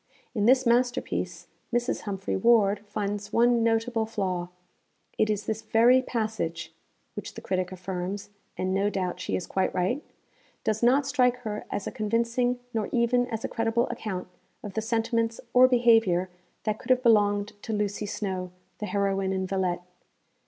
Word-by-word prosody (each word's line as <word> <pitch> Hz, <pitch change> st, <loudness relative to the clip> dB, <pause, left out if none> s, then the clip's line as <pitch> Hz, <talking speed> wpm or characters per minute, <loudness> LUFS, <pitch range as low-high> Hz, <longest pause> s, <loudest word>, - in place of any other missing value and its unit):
In 210 Hz, -3 st, +1 dB
this 260 Hz, +1 st, +5 dB
masterpiece, 245 Hz, +1 st, 0 dB, 0.3 s
Mrs. 240 Hz, +1 st, 0 dB
Humphry 195 Hz, -1 st, -2 dB
Ward 210 Hz, -1 st, +4 dB
finds 205 Hz, 0 st, -3 dB
one 235 Hz, +1 st, +4 dB
notable 225 Hz, 0 st, +1 dB
flaw: 185 Hz, -5 st, -2 dB, 0.7 s
it 215 Hz, -, +3 dB
is 210 Hz, -1 st, -1 dB
this 220 Hz, 0 st, -2 dB
very 240 Hz, +4 st, +5 dB
passage 220 Hz, -9 st, -3 dB, 0.4 s
which -, -, -7 dB
the -, -, -7 dB
critic 185 Hz, -1 st, -1 dB
affirms 185 Hz, +2 st, -5 dB, 0.3 s
(and 185 Hz, 0 st, -1 dB
no 195 Hz, +2 st, +2 dB
doubt 185 Hz, -3 st, -2 dB
she -, -, -2 dB
is 180 Hz, -, -3 dB
quite 190 Hz, -, 0 dB
right) 185 Hz, +11 st, 0 dB, 0.6 s
does 220 Hz, 0 st, 0 dB
not 260 Hz, +4 st, +4 dB
strike 255 Hz, -2 st, +3 dB
her 210 Hz, -3 st, -4 dB
as 200 Hz, -, -3 dB
a -, -, -3 dB
convincing 235 Hz, +2 st, 0 dB
nor 220 Hz, -2 st, -1 dB
even 245 Hz, +1 st, +2 dB
as 225 Hz, -2 st, -4 dB
a -, -, 0 dB
credible 230 Hz, +1 st, 0 dB
account 215 Hz, -7 st, -4 dB, 0.4 s
of 205 Hz, -, -6 dB
the 220 Hz, -, -1 dB
sentiments 230 Hz, 0 st, 0 dB
or 255 Hz, +1 st, +8 dB
behaviour 225 Hz, -8 st, +4 dB, 0.3 s
that 215 Hz, -1 st, -1 dB
could 255 Hz, -, -12 dB
have 255 Hz, 0 st, +4 dB
belonged 205 Hz, -3 st, +4 dB
to -, -, -5 dB
Lucy 210 Hz, 0 st, -1 dB
Snowe, 190 Hz, -3 st, -3 dB, 0.3 s
the 210 Hz, -, -3 dB
heroine 195 Hz, -2 st, 0 dB
in 190 Hz, 0 st, -1 dB
_Villette. 185 Hz, -2 st, -1 dB
215 Hz, 160 wpm, -27 LUFS, 195-235 Hz, 0.7 s, or